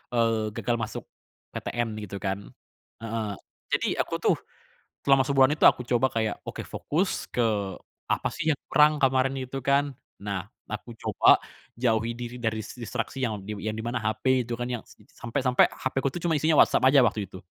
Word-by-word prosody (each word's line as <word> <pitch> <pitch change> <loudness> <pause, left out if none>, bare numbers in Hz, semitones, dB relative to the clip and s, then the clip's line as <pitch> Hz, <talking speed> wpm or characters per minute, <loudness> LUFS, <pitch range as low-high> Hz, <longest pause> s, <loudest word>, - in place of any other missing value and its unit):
eee, 115 -2 +2
gagal 120 -1 0
masuk 110 - -5 0.5
PTN 120 -1 -2 0.2
gitu 100 - -7
kan 95 +1 -1 0.6
heeh. 110 -2 -2 0.4
Jadi, - - 0
aku - - 0
tuh - - +2 0.7
selama 135 -1 +5
sebulan 135 -1 +5
itu, - - +6
aku 125 - +5
coba 125 +1 +2
kayak, 110 -2 0
oke - - -5
fokus 180 +6 -2
ke 120 - +2 0.6
apa - - 0
sih 155 -1 +1
yang - - -17
kurang 150 0 +6
kemarin 135 0 +3
itu 130 +1 -5
kan. 140 +1 +3 0.4
Nah, 100 -4 -3 0.2
aku - - -6
coba - - +4 0.3
jauhi 115 -1 +1
diri 120 0 -6
dari 110 -2 -1
dis - - -10
distraksi 120 +3 -4
yang 105 -4 -2
di 105 +1 -6
yang 110 - -1
di 110 - -5
mana, 120 +1 -2
HP 115 +3 +1
itu 120 - -3
kan 120 +1 -4
yang 120 -2 -3
s - - -17 0.2
sampe 120 +3 -3
sampe 125 -1 +5
HP 130 - -5
ku 135 - 0
tuh, 175 - -5
cuma 165 -3 +2
isinya 155 +2 +2
WhatsApp 130 - +2
aja 135 0 +7
waktu 105 -3 +1
itu. 95 - -11
120 Hz, 190 wpm, -27 LUFS, 110-135 Hz, 0.7 s, aja